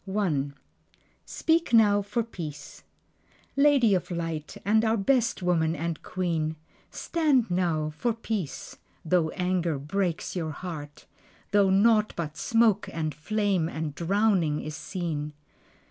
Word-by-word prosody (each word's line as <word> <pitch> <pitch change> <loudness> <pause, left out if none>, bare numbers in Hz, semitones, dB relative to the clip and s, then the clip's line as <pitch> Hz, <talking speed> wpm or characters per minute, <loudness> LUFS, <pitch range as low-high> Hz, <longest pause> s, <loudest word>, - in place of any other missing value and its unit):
Speak 325 -5 +1
Now 205 -3 +6
for 210 +4 -1
Peace 165 -9 -8 0.7
Lady 275 -6 +5
of 180 - 0
Light, 165 -3 -4
and 220 +2 +3
our 225 0 +2
best 235 -1 +1
woman, 165 -2 +2
and 165 +1 -3
queen, 165 -4 -2 0.3
Stand 285 - +1
now 165 -4 0
for 240 +8 0
peace, 220 -8 -4 0.3
(though 165 -1 +2
anger 180 -4 -1
breaks 170 +6 -2
your 165 -3 -2
heart), 150 -4 -8 0.5
Though 200 -1 +4
naught 215 +2 +4
but 155 -3 -4
smoke 225 +1 +2
and 155 -2 -2
flame 195 +1 0
and 160 -3 -4
drowning 180 -3 +1
is 155 0 -5
seen. 155 -6 -4
180 Hz, 120 wpm, -27 LUFS, 160-215 Hz, 0.7 s, Now